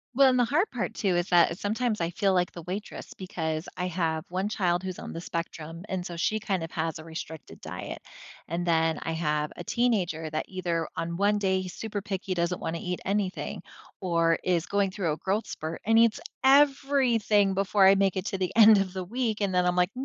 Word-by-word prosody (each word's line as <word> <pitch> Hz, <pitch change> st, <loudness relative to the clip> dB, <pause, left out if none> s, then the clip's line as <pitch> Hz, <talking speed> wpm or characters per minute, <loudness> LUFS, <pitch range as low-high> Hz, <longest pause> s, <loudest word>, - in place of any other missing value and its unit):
Well, 275 Hz, +1 st, +7 dB
and 255 Hz, -1 st, +2 dB
the 245 Hz, -, +4 dB
hard 305 Hz, -, +1 dB
part, -, -, -3 dB
too, 195 Hz, -5 st, +1 dB
is 175 Hz, +1 st, 0 dB
that 175 Hz, -1 st, +5 dB
is 170 Hz, -, -6 dB
sometimes 220 Hz, 0 st, -1 dB
I 170 Hz, -, 0 dB
feel 195 Hz, +2 st, +1 dB
like 180 Hz, -1 st, +1 dB
the 170 Hz, -, -9 dB
waitress, 190 Hz, +5 st, -6 dB
because 160 Hz, -3 st, -4 dB
I 180 Hz, 0 st, -1 dB
have 165 Hz, -2 st, -1 dB
1 190 Hz, +3 st, -1 dB
child 180 Hz, -4 st, +1 dB
who's 185 Hz, -1 st, -5 dB
on -, -, -7 dB
the 165 Hz, -, -5 dB
spectrum, 165 Hz, 0 st, -5 dB
and 185 Hz, -2 st, -3 dB
so 175 Hz, -, -6 dB
she 215 Hz, +6 st, 0 dB
kind 195 Hz, -5 st, -2 dB
of 165 Hz, -, -6 dB
has 160 Hz, -1 st, -2 dB
a 155 Hz, -, -9 dB
restricted 160 Hz, -1 st, -8 dB
diet. -, -, -7 dB, 0.5 s
And 170 Hz, +2 st, -2 dB
then, 165 Hz, -2 st, +2 dB
I 165 Hz, -, -2 dB
have 150 Hz, -2 st, -1 dB
a 175 Hz, -, -7 dB
teenager, 185 Hz, -9 st, 0 dB
that 155 Hz, 0 st, -2 dB
either 170 Hz, -4 st, -2 dB
on 170 Hz, 0 st, -3 dB
one 205 Hz, +2 st, +3 dB
day, 190 Hz, -2 st, +1 dB
he's 185 Hz, -2 st, -7 dB
super 210 Hz, -2 st, -4 dB
picky, 195 Hz, -1 st, -3 dB
doesn't 175 Hz, 0 st, -1 dB
wanna 165 Hz, +1 st, -3 dB
eat 180 Hz, 0 st, -3 dB
anything, 195 Hz, -1 st, -2 dB, 0.4 s
or 170 Hz, -2 st, +2 dB
is 175 Hz, -3 st, +1 dB
going 200 Hz, -1 st, +1 dB
through 185 Hz, -5 st, -1 dB
a -, -, -5 dB
growth 200 Hz, +6 st, -1 dB
spurt 160 Hz, +1 st, -5 dB
and 225 Hz, +1 st, +5 dB
eats 230 Hz, -1 st, +4 dB, 0.2 s
everything 265 Hz, -7 st, +4 dB
before 195 Hz, +1 st, +3 dB
I 195 Hz, -, +8 dB
make 195 Hz, -1 st, +2 dB
it 185 Hz, -, -2 dB
to 195 Hz, -, -2 dB
the 185 Hz, -2 st, -1 dB
end 220 Hz, -1 st, +8 dB
of 190 Hz, -2 st, -2 dB
the 190 Hz, -1 st, -3 dB
week, 225 Hz, +2 st, -2 dB
and 200 Hz, -2 st, 0 dB
then 180 Hz, 0 st, +3 dB
I'm 180 Hz, 0 st, +2 dB
like, 180 Hz, 0 st, +2 dB
185 Hz, 225 wpm, -27 LUFS, 170-205 Hz, 0.5 s, I